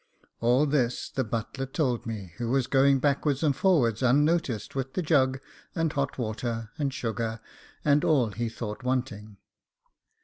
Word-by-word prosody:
All 125 +5 +3
this 130 -5 0
the 130 - -1
butler 115 +4 -4
told 130 -5 -1
me, 100 -6 -6
who 120 -1 -3
was 130 0 +2
going 135 +1 +4
backwards 140 +1 +1
and 145 -3 +2
forwards 135 - +2
unnoticed 140 - +2
with 135 -1 -3
the 185 - -1
jug, 135 -4 +2 0.4
and 165 -3 0
hot 140 -1 -2
water, 115 -1 -3
and 140 -2 0
sugar, 115 -2 -3 0.5
and 145 0 +4
all 130 -9 +3
he 115 +3 -3
thought 110 -1 -6
wanting. 120 -5 -3
130 Hz, 150 wpm, -27 LUFS, 115-140 Hz, 0.5 s, going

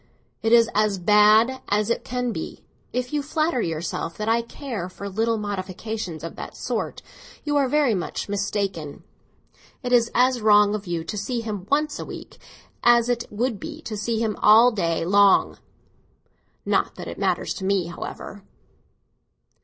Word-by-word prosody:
It 225 - 0
is 230 -1 +6
as 210 -1 +2
bad 215 +6 +4
as 210 +2 +1
it - - -1
can 250 -1 -2
be. - - -6 0.3
If 250 +2 -3
you 295 - +1
flatter 310 -2 0
yourself 165 -1 -3
that 215 - -4
I 230 +1 +3
care 235 -6 -6
for 200 +2 -8
little 225 +3 0
modifications 200 -3 -5
of 165 - -6
that - - -8
sort, - - -3 0.4
you 295 -1 -1
are 280 -2 +3
very 290 -4 +3
much 180 -4 -3
mistaken. 200 -6 -3 0.8
It 250 0 -1
is 235 -1 +4
as 250 0 +3
wrong 210 -1 +5
of 210 -2 -4
you 170 -2 -2
to 190 +6 -5
see 235 +3 -2
him 205 -4 -5
once 300 +1 0
a - - -5
week - - -10 0.4
as 240 0 +5
it 240 -1 0
would 225 0 -2
be - - -7
to 220 - -5
see 225 +2 -2
him 220 -2 -1
all 225 +4 +7
day 165 -6 -1
long. 200 +2 +4 1.1
Not - - 0
that - - -8
it - - -7
matters - - 0
to 190 - -8
me, 195 -2 +1
however." 180 +3 -8
215 Hz, 170 wpm, -24 LUFS, 195-240 Hz, 1.1 s, all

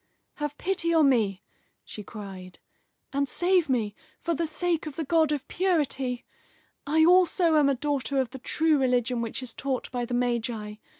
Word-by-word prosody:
"Have 295 -1 -4
pity 350 -2 0
on 305 -3 +5
me," 210 -7 +1 0.4
she 210 - -8
cried, 195 -4 -9 0.6
"and 280 0 0
save 350 -1 +2
me, 225 -5 0 0.3
for 335 - -1
the 330 +1 -1
sake 335 0 -1
of 295 - -7
the 320 - -2
God 315 0 +2
of 290 -2 -2
Purity! 280 -9 -1 0.6
I 315 +2 +4
also 355 -1 +4
am 295 -2 +5
a 275 - +2
daughter 280 0 -2
of 255 -3 -1
the 265 - -8
true 315 +3 +2
religion 250 -2 +1
which 230 +3 -4
is 245 - -3
taught 265 -2 -3
by 245 -1 -2
the 245 0 -3
Magi. 235 -3 -2
275 Hz, 175 wpm, -27 LUFS, 245-320 Hz, 0.6 s, on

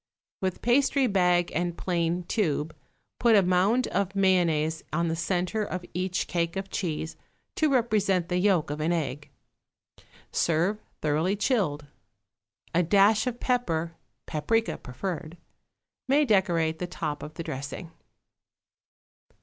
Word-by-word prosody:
With 185 -1 -2
pastry 270 +3 +3
bag 180 -5 +2
and 175 +1 -1
plain 175 -1 -1
tube 160 -5 -1 0.4
put 235 -2 +5
a 200 - +6
mound 185 +8 +3
of 195 0 -1
mayonnaise 170 -5 +2
on 170 +1 0
the 165 - -1
centre 180 +5 -1
of 185 -3 -5
each 185 +1 -1
cake 170 0 -1
of 195 0 -4
cheese, 160 -3 -3 0.4
to 310 -2 +2
represent 205 -8 +2
the 180 -1 0
yolk 180 -6 +2
of 150 - -4
an 160 +3 +1
egg. 145 -4 -2 1.0
Serve 170 +6 +1 0.2
thoroughly 155 +6 +1
chilled. 195 - 0 0.9
A 175 - +4
dash 205 +6 +4
of 245 -1 -3
pepper 170 -10 0 0.3
(paprica 225 +9 0
preferred) 165 +5 -5 0.7
may 290 +3 +4
decorate 170 - +2
the 180 - -3
top 155 -4 -4
of 150 - -8
the 165 - -5
dressing. 145 +5 -6
180 Hz, 130 wpm, -27 LUFS, 165-205 Hz, 1.0 s, a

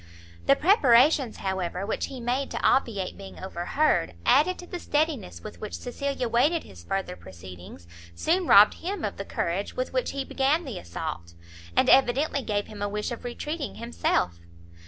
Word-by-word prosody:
The 275 - +7
preparations, 275 - +4
however, 190 -1 -3
which 215 - -2
he 265 - -8
made 250 +3 -1
to - - -4
obviate 205 -9 +1
being 195 -1 -10
overheard, 175 - 0
added 310 +7 +4
to 355 - -9
the 355 0 -6
steadiness 290 - -1
with 85 - -9
which 85 - -5
Cecilia 270 - -3
waited 285 +9 +2
his 85 -2 -14
further 190 - -3
proceedings, 90 0 -12 0.3
soon 345 - +1
robbed 205 +2 +8
him 390 +4 -3
of - - -4
the - - -5
courage - - -2
with - - -3
which - - 0
he 275 -1 -3
began 285 +7 +1
the 255 -8 -5
assault, 85 0 -6 0.4
and - - +4
evidently 270 +3 +4
gave 205 -4 -1
him 210 -2 -10
a 205 - -1
wish 210 +3 -3
of 235 - -6
retreating 295 +5 -4
himself. 90 - -1
240 Hz, 170 wpm, -26 LUFS, 180-290 Hz, 0.4 s, robbed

